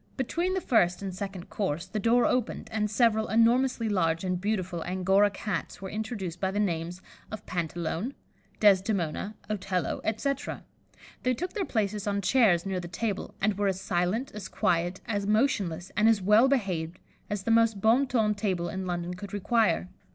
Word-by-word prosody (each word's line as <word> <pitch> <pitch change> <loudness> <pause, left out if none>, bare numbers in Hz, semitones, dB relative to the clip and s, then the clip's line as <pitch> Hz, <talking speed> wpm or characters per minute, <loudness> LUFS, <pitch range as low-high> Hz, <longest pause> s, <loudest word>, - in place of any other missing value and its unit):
Between 340 +8 -1
the 375 - -1
first 180 - +2
and 190 -2 -4
second 195 -1 -6
course, 185 -4 -2
the 210 +3 -4
door 235 +3 +3
opened, 250 -3 -1
and 210 -1 0
several 220 0 +2
enormously 235 +1 +3
large 165 -5 +1
and 180 -1 -1
beautiful 185 -5 -2
Angora 190 +3 +3
Cats 195 -4 -4
were 190 0 -7
introduced 205 -5 -4
by 190 - 0
the 200 +2 -2
names 175 -2 -2 0.3
of 215 -1 -7
Pantalone, 175 - -3 0.4
Desdemona, 195 -1 +2
Otello, 190 -4 -2
etc.: 270 +5 -2 0.6
they 255 0 +1
took 360 +7 -4
their 405 -4 -1
places 210 -4 -1
on 200 0 0
chairs 200 -4 +3
near 190 -1 -2
the 175 - -6
table, 195 +3 -3
and 205 0 0
were 205 - +2
as 190 -1 0
silent, 185 +8 -1
as 205 -3 -6
quiet, 175 +1 0
as 205 -3 -2
motionless, 205 - +1
and 215 +2 +4
as 225 -2 +4
well 210 +6 +5
behaved 185 -11 -1 0.3
as 205 -2 -3
the 230 - 0
most 225 -2 +4
bon 235 +7 +4
ton 220 -4 +2
table 185 -5 -1
in 190 +2 -4
London 175 0 -3
could 195 +2 -8
require. 205 - +1
200 Hz, 175 wpm, -28 LUFS, 180-225 Hz, 0.6 s, well